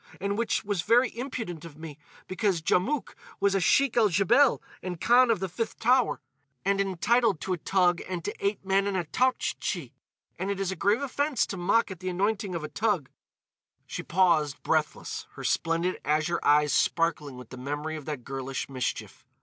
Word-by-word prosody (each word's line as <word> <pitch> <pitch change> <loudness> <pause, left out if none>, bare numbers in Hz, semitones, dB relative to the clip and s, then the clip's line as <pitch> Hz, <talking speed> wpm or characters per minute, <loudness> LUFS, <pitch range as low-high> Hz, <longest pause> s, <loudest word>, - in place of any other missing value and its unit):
And 200 +1 -1
which 230 +1 0
was 200 -3 -1
very 240 +7 +3
impudent 230 - -5
of 160 -3 -11
me, 155 -2 -9 0.3
because 190 -2 0
Djamouk 210 - 0 0.3
was 200 0 +2
a 195 - +2
Sheik 270 +8 +3
el 225 -3 +4
Djebel 230 +9 +4 0.2
and 180 -2 -5
Khan 245 +4 +5
of 225 -4 +2
the 190 - -2
Fifth 220 +6 -4
Tower, 250 - +2 0.5
and 200 0 +2
entitled 200 +1 +2
to 190 - -1
a - - -2
toug 180 0 +2
and 175 -3 -4
to - - -2
eight 200 -1 -1
men 195 +1 +2
and 200 -2 -1
a 180 - 0
Toughtchi. 255 +10 -1 0.5
And 190 - -2
it 200 -1 -2
is 195 -1 -1
a - - -3
grave 205 +9 +1
offence 285 -1 0
to - - -6
mock 195 +4 +1
at 185 - -8
the 185 0 -3
anointing 200 +1 -1
of 165 - -4
a - - -3
toug." 205 - 0 0.8
She - - -5
paused, 165 -5 +2
breathless, - - -1
her - - -9
splendid 165 +2 0
azure 155 +3 +1
eyes 150 0 +4
sparkling 150 -5 +1
with 125 -3 -11
the 130 - -8
memory 145 +4 -4
of 155 -3 -8
that 145 -5 -5
girlish 135 0 -4
mischief. 130 -2 -4
190 Hz, 190 wpm, -27 LUFS, 165-220 Hz, 0.8 s, Khan